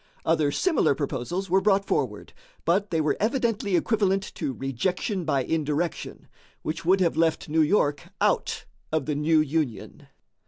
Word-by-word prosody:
Other 155 -3 +2
similar 320 - +2
proposals 165 +7 -3
were 190 +2 +3
brought 195 0 +3
forward, - - -2 0.3
but 195 +4 +2
they 165 - 0
were 155 -1 +1
evidently 225 -4 0
equivalent 195 0 +1
to 150 -5 -3
rejection 175 - -2
by 140 -4 +1
indirection, 155 +3 -2 0.4
which 160 +2 -4
would 190 +3 +3
have 170 -2 +2
left 160 -1 +1
New 160 +1 +3
York 150 -3 +1
out - - 0 0.3
of 155 -3 0
the 150 - -1
new 155 +2 +2
Union. 150 -6 -3
165 Hz, 150 wpm, -26 LUFS, 150-195 Hz, 0.4 s, were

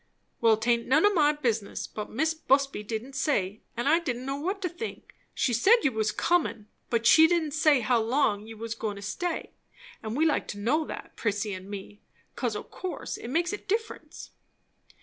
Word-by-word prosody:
"Well, 225 -2 +4
'taint 235 +1 +1
none 300 +8 +4
o' 415 - +4
my 300 -5 +4
business, 230 -8 -2
but 210 -1 -7
Mis' 315 +7 0
Busby 275 -6 +1
didn't 225 +5 -5
say, 215 - 0 0.2
and 240 +3 -1
I 320 +3 +5
didn't 255 -7 -4
know 275 +1 -2
what 380 +7 -2
to - - +1
think. 360 +7 -8 0.2
She 245 - +1
said 435 - +5
you 280 - +3
was 220 -2 0
comin', 235 -4 0 0.2
but 230 -1 0
she 320 +6 +8
didn't 330 -3 +1
say 305 -3 +4
how 240 +1 +2
long 220 -3 +1
you 225 0 -10
was 225 +1 -4
goin' 220 -2 -4
to 200 - -9
stay; 345 - -3 0.5
and 220 +3 -4
we'd 315 - +3
like 305 - 0
to 205 - -6
know 290 +10 +1
that, - - -8
Prissy 205 -1 -1
and 185 +1 -8
me; 205 0 -8 0.3
'cause 240 -4 -2
o' 210 - -4
course 370 -1 -6
it - - -8
makes 340 +8 0
a - - -1
difference." 440 +3 -4
250 Hz, 200 wpm, -28 LUFS, 220-315 Hz, 0.5 s, she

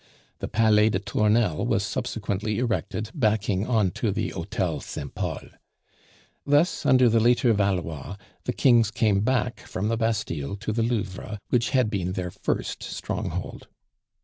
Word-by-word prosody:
The - - -3
Palais 110 -1 +4
des 100 - 0
Tournelles 105 -1 +1
was 110 -4 +1
subsequently 110 -3 -2
erected 110 -2 -2
backing 105 - +1
on 110 -7 +2
to - - -1
the - - -1
Hotel - - -2
Saint 70 -2 -7
Pol. - - -4 0.9
Thus, 145 +5 +2
under 130 -1 +6
the 115 0 +4
later 120 +1 +4
Valois, 95 -4 -1 0.3
the - - -1
kings 120 -4 +4
came 110 -2 +2
back 125 +2 0
from 100 +3 -3
the 115 - 0
Bastille 100 -9 -1
to 110 +1 -4
the 115 - 0
Louvre, 105 -2 -2
which 120 -2 +2
had 125 -5 +2
been 90 -3 -1
their 90 -1 -3
first - - -3
stronghold. - - -5
110 Hz, 150 wpm, -25 LUFS, 100-115 Hz, 0.9 s, under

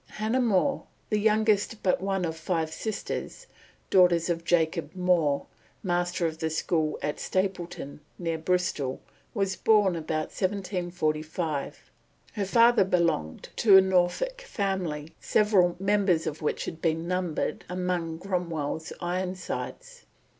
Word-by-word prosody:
Hannah 220 +4 0
More, 235 +4 +1 0.3
the 210 - +2
youngest 215 0 +2
but 185 -1 +2
one 195 -1 0
of 160 -1 -3
five 160 -1 -2
sisters, 220 - -4 0.5
daughters 175 -2 +5
of 165 -1 -2
Jacob 165 -2 0
More, 175 -6 +2 0.4
master 175 -1 0
of 160 -1 -2
the 160 - -1
school 160 0 0
at 150 - -2
Stapleton, 180 -6 -3 0.2
near 165 -2 -2
Bristol, 160 -6 -1 0.4
was 195 -2 0
born 205 -5 +3
about 155 -1 -2
1745. 175 -6 -2 0.4
Her 205 -3 -1
father 230 +2 +5
belonged 170 - 0
to 205 -4 +7
a - - +9
Norfolk 190 - +1
family, 185 - -3
several 190 -5 +3
members 195 -4 +2
of 155 +2 -4
which 150 - -1
had 160 - -7
been 165 0 0
numbered 180 -3 -2
amongst 180 -2 -2
Cromwell's 165 -4 -2
Ironsides. 185 - -4
180 Hz, 125 wpm, -27 LUFS, 160-195 Hz, 0.5 s, a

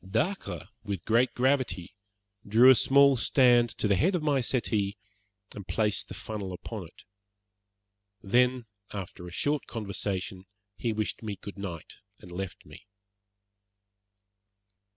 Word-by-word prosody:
Dacre, 105 - -2 0.2
with 100 -5 -4
great 120 +3 +3
gravity, 125 -10 0 0.5
drew 115 +5 +7
a - - +9
small 140 +2 +5
stand 120 -1 +4
to - - 0
the 100 - +3
head 180 - +2
of 170 - -1
my 145 -3 +2
settee, 110 -5 -1 0.6
and 100 -3 -9
placed 105 -2 0
the - - -8
funnel 100 -4 -5
upon 95 0 -7
it. 85 - -19 1.2
Then, 125 +4 +2 0.3
after 90 -3 -7
a - - -9
short 145 - -1
conversation, 100 -3 -4 0.3
he 115 - -2
wished 110 -1 -2
me 105 -3 -4
good 100 +1 -10
night 90 -5 -7 0.2
and 90 - -14
left 95 +1 -6
me. 95 - -14
110 Hz, 130 wpm, -28 LUFS, 95-125 Hz, 1.2 s, a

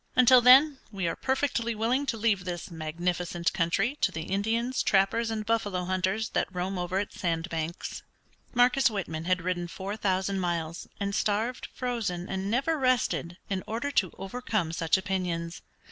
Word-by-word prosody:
Until 255 0 +7
then, 265 +3 +7
we 190 -4 -2
are - - -1
perfectly 260 -4 0
willing 245 +6 0
to 230 - -1
leave 210 -4 +1
this 175 0 -5
magnificent 170 +2 -2
country 185 - +1
to - - +3
the 160 - -4
Indians, 225 +7 0
trappers 205 +4 +2
and 220 -1 -3
buffalo 205 -5 0
hunters 185 +4 0
that - - 0
roam 185 +1 -3
over 180 +1 -2
its 205 - -5
sand 165 -1 -1
banks." 165 0 -4 0.5
Marcus 250 +2 +4
Whitman 165 -7 -4
had 185 -1 +1
ridden 175 -1 -1
four 195 +4 -5
thousand 190 -1 0
miles, 170 -2 -2
and 200 0 -2
starved, 215 +5 0
frozen, 220 -8 -2
and 190 +1 -3
never 275 +8 +1
rested 245 -9 +1
in 190 -2 -2
order 235 +6 -2
to 190 -10 +2
overcome 195 -3 -2
such 165 +1 +2
opinions. 180 -3 -3
195 Hz, 160 wpm, -28 LUFS, 175-230 Hz, 0.5 s, Until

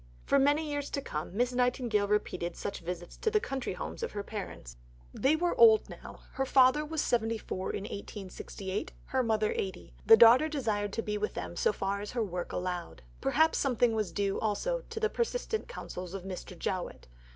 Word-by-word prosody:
For 280 - +4
many 290 +3 +3
years 290 -1 -3
to - - -2
come, 155 +6 -5
Miss 245 +1 +1
Nightingale 245 -4 +1
repeated 185 -4 -1
such 200 - -4
visits 175 0 -6
to 450 - 0
the 425 -1 +3
country 270 -9 -3
homes - - -6
of 465 - -3
her 205 - -3
parents. 190 - -7 0.4
They 280 +4 +3
were 345 +2 +1
now - - -2
old; 445 -2 +8 0.5
her 270 +1 -1
father 260 +3 +5
was 310 0 -2
74 225 -5 -1
in 200 - -3
1868, 200 -1 -6
her 260 - 0
mother 220 -3 +1
80. 190 -2 -4
The 225 - +8
daughter 240 +7 +7
desired 215 -9 -1
to 225 - -2
be 210 0 -2
with 210 - -2
them - - -5
so 460 - +2
far 200 - -2
as 205 - -6
her 240 -2 0
work 180 -3 -4
allowed. 180 - -4 0.2
Perhaps 320 +1 +3
something 245 -3 +2
was 215 -3 -1
due 200 -1 -1
also 480 - -1
to - - -4
the 440 - +2
persistent 465 -1 -2
counsels 185 - -7
of 190 - -6
Mr. 185 -1 -7
Jowett. 185 +1 -4
225 Hz, 190 wpm, -30 LUFS, 195-285 Hz, 0.5 s, old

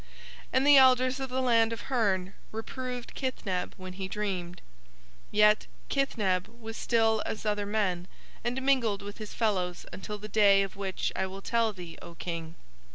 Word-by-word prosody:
And 260 - +3
the 290 -1 +8
elders 255 0 +5
of 265 -1 -3
the 260 +1 -1
land 230 -2 +4
of 230 - -4
Hurn 195 -8 0 0.2
reproved 250 +2 -5
Kithneb 195 -9 -2
when 185 0 -8
he 190 0 -4
dreamed; 185 -4 -4 0.7
yet 210 0 +4 0.2
Kithneb 205 -9 +1
was 225 -1 -9
still 225 -2 +2
as 215 - -5
other 205 -1 0
men 190 -4 0 0.4
and 250 +2 -1
mingled 235 -7 +2
with 205 +2 -8
his 215 -1 -7
fellows 185 -6 0
until 210 +2 -5
the 210 +1 -8
day 200 -2 +5
of 195 - -6
which 195 -1 -2
I 190 - 0
will 195 +1 -9
tell 230 -2 +2
thee, 175 -4 -10
O 170 - -10
King. 165 -1 -5
210 Hz, 165 wpm, -29 LUFS, 190-235 Hz, 0.7 s, the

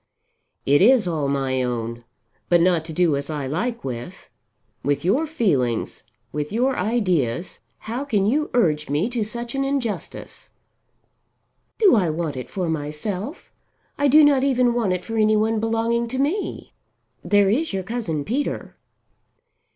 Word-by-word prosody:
"It 145 +1 +4
is 230 -1 +5
all 155 -5 -1
my 135 -2 0
own, 120 -1 -3 0.4
but 175 - +5
not 170 -2 +3
to 165 - -5
do 165 -2 +2
as 140 +1 -4
I 150 -3 -3
like 225 - -2
with. 130 +8 -7 0.5
With 145 +2 -1
your 265 - +2
feelings, 145 - -1 0.3
with 150 0 -4
your 255 +5 +1
ideas, 180 - -1 0.2
how 240 +6 -4
can 210 -8 +1
you 290 +8 +1
urge 155 - +2
me 150 - 0
to 235 -3 -1
such 235 +3 -5
an 275 0 0
injustice?" 270 -6 -4 1.3
"Do 410 - +5
I 185 -7 +2
want 155 -2 -2
it 125 - -6
for 185 -3 -3
myself? 160 - -4 0.4
I 285 - +2
do 300 +3 +7
not 280 -2 +4
even 250 -3 +3
want 230 -5 0
it 180 0 -4
for 225 0 -4
any 215 0 +4
one 220 +1 +1
belonging 230 +1 0
to 255 +3 -4
me. 305 +10 -2 0.5
There 205 -1 +3
is 295 +10 +1
your 190 -1 -2
cousin 180 -9 -3
Peter." 275 +6 -3
205 Hz, 155 wpm, -22 LUFS, 150-240 Hz, 1.3 s, do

